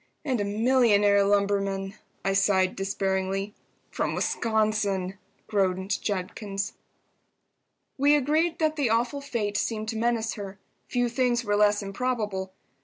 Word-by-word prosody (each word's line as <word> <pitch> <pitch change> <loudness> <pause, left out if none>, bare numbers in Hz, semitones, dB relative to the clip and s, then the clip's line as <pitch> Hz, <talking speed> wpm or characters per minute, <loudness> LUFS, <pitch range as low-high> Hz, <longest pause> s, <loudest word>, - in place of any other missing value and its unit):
"And 255 -7 0
a - - +1
millionaire 205 -2 +3
lumberman!" 200 -1 +1 0.3
I 195 - +2
sighed, 195 -1 +2
despairingly. 195 +1 -1 0.4
"From - - -1
Wisconsin!" 210 -4 0 0.3
groaned 190 -1 0
Judkins. 195 +1 -3 1.3
We 290 +2 +5
agreed 310 +4 +1
that 315 -1 0
the 280 -5 +1
awful 240 +5 0
fate 220 -7 -2
seemed 220 -1 -2
to 225 - -3
menace 230 -1 0
her. 195 -2 -7 0.3
Few 245 -1 +1
things 240 0 +1
were 205 0 +1
less 205 0 +3
improbable. 205 -3 -2
205 Hz, 120 wpm, -26 LUFS, 195-240 Hz, 1.3 s, We